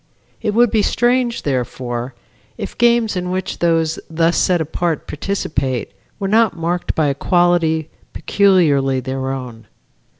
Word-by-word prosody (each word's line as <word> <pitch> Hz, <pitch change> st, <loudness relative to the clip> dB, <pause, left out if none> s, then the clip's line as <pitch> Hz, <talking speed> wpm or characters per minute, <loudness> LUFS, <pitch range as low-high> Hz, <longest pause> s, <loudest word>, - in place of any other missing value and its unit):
It 215 Hz, -2 st, -1 dB
would 240 Hz, -1 st, +4 dB
be 220 Hz, -, +3 dB
strange, 240 Hz, +2 st, +1 dB
therefore, 125 Hz, -2 st, -3 dB, 0.4 s
if 205 Hz, -4 st, -6 dB
games 235 Hz, -3 st, +3 dB
in 180 Hz, 0 st, -2 dB
which 185 Hz, +1 st, -3 dB
those 165 Hz, -2 st, +1 dB
thus 165 Hz, +1 st, +1 dB
set 180 Hz, -2 st, +2 dB
apart 160 Hz, +1 st, -2 dB
participate, 145 Hz, -, -3 dB, 0.3 s
were 195 Hz, -, -3 dB
not 220 Hz, -3 st, +3 dB
marked 170 Hz, +2 st, -2 dB
by 155 Hz, -, +2 dB
a 140 Hz, -, +1 dB
quality 165 Hz, 0 st, +2 dB, 0.2 s
peculiarly 150 Hz, -10 st, +2 dB
their 130 Hz, +1 st, -4 dB
own. 125 Hz, -4 st, -6 dB
170 Hz, 135 wpm, -18 LUFS, 135-200 Hz, 0.4 s, would